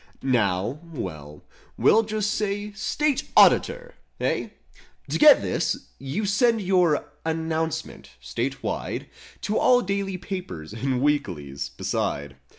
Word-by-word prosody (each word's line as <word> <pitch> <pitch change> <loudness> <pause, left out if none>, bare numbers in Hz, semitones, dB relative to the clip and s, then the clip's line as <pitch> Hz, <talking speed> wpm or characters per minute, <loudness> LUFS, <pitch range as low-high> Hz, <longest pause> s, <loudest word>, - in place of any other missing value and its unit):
Now—well, 105 - -2 0.3
we'll 225 - +5
just 215 -1 -1
say 205 -1 -2
State 275 +7 -1
Auditor - - +5 0.3
I - - -6
Hey? - - -1 0.6
To - - -1
get 300 -1 +8
this, - - -2
you 140 +11 -3
send 225 +3 +3
your 180 -5 +2
"Announcement"— 160 - -3
state 65 +1 -4
wide— - - -3 0.4
To 215 - 0
all 250 -1 +5
daily 195 -1 -2
papers 180 - -6
and 130 +2 -1
weeklies, 85 - -1
beside. 70 -2 -3
160 Hz, 115 wpm, -25 LUFS, -, 0.6 s, get